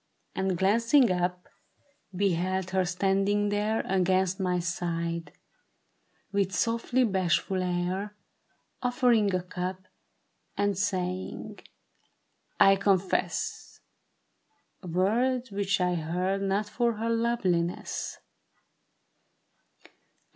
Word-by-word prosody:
And 190 -2 -1
glancing 230 - +4
up, 180 0 -1 0.6
beheld 185 0 0
her 190 -1 +2
standing 195 +3 +1
there 210 +2 0
Against 190 0 +1
my 180 -1 +1
side, 170 -1 -3 1.0
with 200 -2 0
softly 235 +4 +1
bashful 190 -2 +1
air, 180 +3 -2 0.7
Offering 245 -4 +3
a 180 - -1
cup, 185 +1 -5 0.7
and 205 -1 +1
saying, 185 -1 -3 1.0
I 195 0 +7
confess, 195 -1 -1 1.0
Words 225 +8 0
which 195 -1 0
I 180 0 +1
heard 180 +4 -1
not 200 +2 0
for 235 +2 0
her 225 +2 -2
loveliness. 200 -7 -1
190 Hz, 85 wpm, -28 LUFS, 180-205 Hz, 1.0 s, I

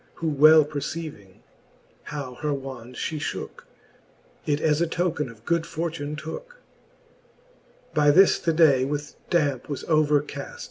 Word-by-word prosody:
Who 165 - -2
well 155 +1 +7
perceiving, 145 - -7 0.6
how 140 -4 -6
her 150 -1 0
wand 130 -3 -8
fhe 155 - -3
fhooke. 145 - -6 0.8
It 145 -1 +1
as 155 0 +1
a 170 - +2
token 165 -4 -1
of 115 0 -15
good 170 -1 +1
fortune 165 -3 -4
tooke. 160 - -8 1.4
By 150 -1 +4
this 185 +6 +6
the 165 - 0
day 155 -5 +5
with 145 +2 -3 0.2
dampe 145 -7 0
was 145 - -4
overcaft. 155 - 0
150 Hz, 135 wpm, -25 LUFS, 140-165 Hz, 1.4 s, well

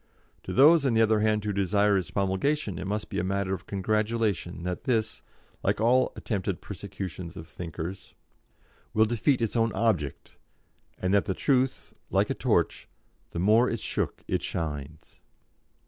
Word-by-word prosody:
To - - -7
those, 150 +4 +6
on 130 -4 +2
the 110 - +4
other 110 -1 +3
hand, 105 -1 +1
who 105 - -1
desire 100 +1 +2
its 95 -3 -1
promulgation, 100 - 0
it 90 - -4
must 105 +1 -2
be - - -2
a - - 0
matter 95 0 -1
of 95 0 -6
congratulation 105 -3 -1
that 90 0 -4
this, 110 -4 0 0.4
like - - 0
all 125 +3 +3
attempted 100 -4 -2
persecutions 90 -2 -7
of 80 - -8
thinkers, 85 +2 -7 0.8
will 110 +1 +5
defeat 120 +3 +1
its 115 - -1
own 115 -1 +2
object, 90 -12 -1 0.6
and 90 +1 0
that 100 - +3
truth, 130 -1 +1 0.2
like - - +2
a - - +2
torch, - - 0 0.4
'the - - -7
more 110 +6 +5
it's 115 - -3
shook - - -2
it - - 0
shines.'" 75 -1 -5
105 Hz, 160 wpm, -27 LUFS, 90-115 Hz, 0.8 s, those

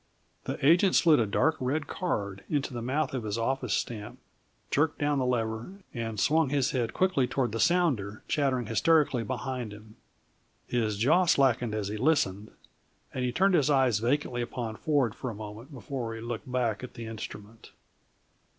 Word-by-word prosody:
The - - -3
agent 175 +5 +5
slid 160 -5 +5
a 115 - +2
dark 150 +10 +2
red 145 +4 -1
card 100 - -3
into 145 -3 -1
the 120 - -4
mouth 135 +4 -1
of 130 -3 -2
his 105 0 -2
office 125 -1 0
stamp, 105 -3 -4 0.5
jerked 155 +2 +2
down 145 -1 +1
the 130 - 0
lever, 115 +4 -2 0.2
and 115 -3 -4
swung 155 +6 +3
his 140 -2 +1
head 120 -3 -1
quickly 185 -9 +2
toward 130 -2 -1
the 115 - -3
sounder 150 - +1
chattering 135 -4 +1
hysterically 140 +3 +3
behind 125 -2 -4
him. 105 +1 -13 0.7
His 110 -4 -1
jaw 155 - +4
slackened 125 -6 +3
as 105 -2 -2
he 105 - -4
listened, 110 -7 +1 0.6
and 130 - -2
he 125 - 0
turned 190 +8 +3
his 150 -4 +3
eyes 130 -7 +3
vacantly 120 +1 0
upon 120 -2 -4
Ford 140 -4 +1
for 130 - -5
a 115 - -6
moment 110 +6 -9
before 125 -3 -5
he 115 - -7
looked 120 +1 -5
back 120 -3 0
at 125 - -8
the 115 -1 -7
instrument. 110 0 -9
125 Hz, 175 wpm, -28 LUFS, 110-145 Hz, 0.7 s, agent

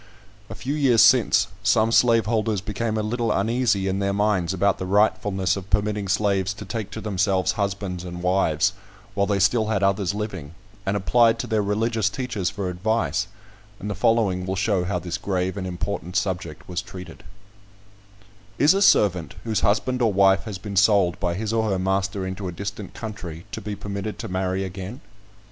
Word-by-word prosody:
A - - -7
few 140 - -3
years 135 -6 +4
since, - - +5
some 110 +1 +3
slaveholders 115 -3 +3
became 110 +3 -3
a 110 - 0
little 115 +2 -1
uneasy 110 -1 +1
in 95 +1 -1
their 100 0 0
minds 100 -4 +1
about 95 +1 +1
the 95 - -4
rightfulness 100 -2 +2
of 95 -1 -7
permitting 105 +1 0
slaves 95 -1 +1
to 105 - -8
take 105 +1 -4
to 110 - -7
themselves 95 -3 +1
husbands 100 -3 -3
and 90 0 -7
wives, 90 0 +2 0.4
while 100 0 +1
they 100 -1 +1
still 110 +3 +2
had 105 -3 0
others 100 0 +1
living, 95 -8 -5 0.3
and 100 +1 +1
applied 115 +4 +3
to - - -3
their 110 -3 +1
religious 110 +1 0
teachers 110 -6 -2
for 100 -1 -4
advice; 100 +2 -1 0.5
and 105 +2 -4
the - - -1
following 100 -3 +1
will 95 - -1
show 95 -1 +1
how 90 0 -1
this 90 +2 -4
grave 95 -1 -1
and 95 -2 -4
important 90 0 -4
subject 90 -5 -2
was 90 -1 -3
treated: 90 -3 -10 1.3
"Is 150 +5 +5
a 195 - 0
servant, 90 - +3
whose 110 -2 0
husband 125 +4 +1
or 115 -3 +3
wife 95 -1 +4
has 105 -3 -5
been 100 +1 -6
sold 100 -2 +4
by 90 -3 -1
his 110 +3 -3
or 110 -1 +1
her 95 - +1
master 95 +1 -1
into 95 +1 -5
a - - -3
distant 100 +2 -6
country, 90 -7 -7
to - - -5
be 105 +1 -5
permitted 100 +1 -5
to 115 0 -5
marry 95 0 -1
again?" 95 +6 -7
100 Hz, 185 wpm, -24 LUFS, 95-110 Hz, 1.3 s, since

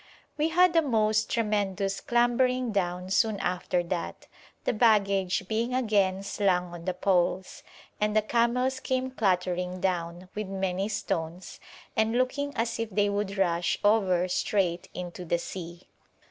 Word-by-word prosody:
We 305 +2 +1
had 355 +2 +4
the 330 - +5
most 215 -6 +1
tremendous 200 -3 -1
clambering 245 +1 +2
down 180 -2 -2
soon 215 0 +2
after 180 -1 -1
that, 170 0 -4 0.4
the - - 0
baggage 200 -5 +2
being 230 +4 -1
again 200 -6 +1
slung 185 -3 0
on 170 -1 -9
the 185 -1 -1
poles, 185 0 0 0.4
and 210 0 +1
the 215 - +3
camels 245 +3 +1
came 260 0 -2
clattering 180 -4 0
down, 175 -1 -2
with 210 -1 -4
many 190 +1 -2
stones, 175 -4 -4 0.4
and 220 +2 +2
looking 285 +3 0
as 230 +1 -1
if 230 -1 -2
they 205 0 +1
would 200 -1 -2
rush 175 -2 +1
over 190 -4 +3
straight 180 -1 0
into 180 0 -6
the 170 0 0
sea. 170 0 -8
200 Hz, 145 wpm, -28 LUFS, 180-230 Hz, 0.4 s, the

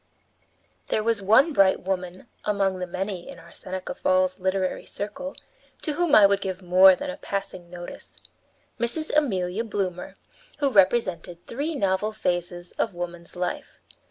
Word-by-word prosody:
There 215 - 0
was 225 -2 +1
one 225 - +5
bright 195 -6 +4
woman 185 0 -4 0.2
among 195 -2 0
the 180 - -3
many 185 0 -4
in - - -9
our 170 - -15
Seneca 185 0 -6
Falls 185 0 +1
literary 190 0 -1
circle 275 +8 -6 0.5
to 305 - -1
whom 340 -1 +3
I 210 - +9
would 200 0 +3
give 190 -1 -3
more 185 +1 +7
than 285 +8 -4
a - - -8
passing 195 -3 -5
notice 175 0 -9 0.6
Mrs. 295 +7 0
Amelia 200 -8 +1
Bloomer, 190 -5 -3 0.4
who 285 -2 +1
represented 185 -5 +2
three 295 +6 -3
novel 200 -2 0
phases 175 -3 -2
of - - 0
woman's 175 -1 -6
life. 180 0 -4
190 Hz, 150 wpm, -25 LUFS, 180-220 Hz, 0.6 s, I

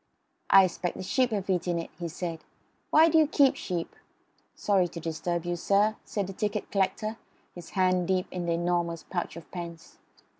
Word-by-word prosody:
"I 195 0 +8
expect 180 -1 -2
the - - -5
sheep 255 +6 +2
have 205 -4 -2
eaten 180 -2 0
it," 165 - -5
he 170 - -3
said. 165 0 -5 0.5
"Why 315 +2 +6
do 325 0 +5
you 310 - +5
keep 280 -3 +4
sheep?" 175 -3 -4 0.6
"Sorry 195 -3 +2
to 170 - -8
disturb 165 +1 -3
you, 175 0 -1
sir," 200 +5 +2
said 205 -2 -2
the 195 - -7
ticket 210 +1 -3
collector, 205 +3 0 0.4
his 175 -2 -10
hand 185 -1 +3
deep 185 -1 +1
in 180 -1 -4
the 170 - +2
enormous 170 -1 -1
pouch 175 -4 -4
of 170 - -12
pence. 170 -2 -8
180 Hz, 185 wpm, -28 LUFS, 170-200 Hz, 0.6 s, I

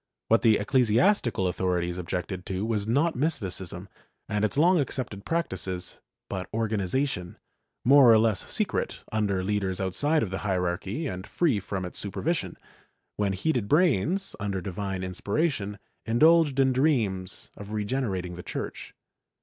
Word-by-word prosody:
What 115 - +5
the 110 -2 +5
eccle 125 +6 +2
siastical 120 - +2
authorities 90 -1 -1
objected 90 +1 -4
to 95 +2 -2
was 110 -2 -1
not 145 +8 +2
Mysticism 95 - -2 0.4
and 105 -1 -1
its 110 +5 0
long 175 +3 +5
accepted 125 -8 -3
practices, 95 - -3 0.3
but 95 -1 -5
organization, 110 -2 -1 0.5
more 135 -1 +8
or 110 - +7
less 110 -3 +1
secret, - - -1
under 100 -4 0
leaders 95 -2 -1
outside 145 - +1
of 100 - -4
the 95 - -3
hierarchy 95 - -2
and 95 -7 -5
free 150 -12 +1
from 95 -1 -4
its 90 - -5
supervision, 100 - -2 0.6
when 100 -2 +1
heated 115 +2 0
brains, 175 - +2
under 100 -2 -2
divine 95 +1 -4
inspiration, 105 - -1 0.3
indulged 150 +4 +4
in 135 -1 +4
dreams 110 -10 0
of 100 0 -9
regenerating 105 -5 -2
the 90 - -7
Church. - - -6
105 Hz, 140 wpm, -27 LUFS, 95-135 Hz, 0.6 s, more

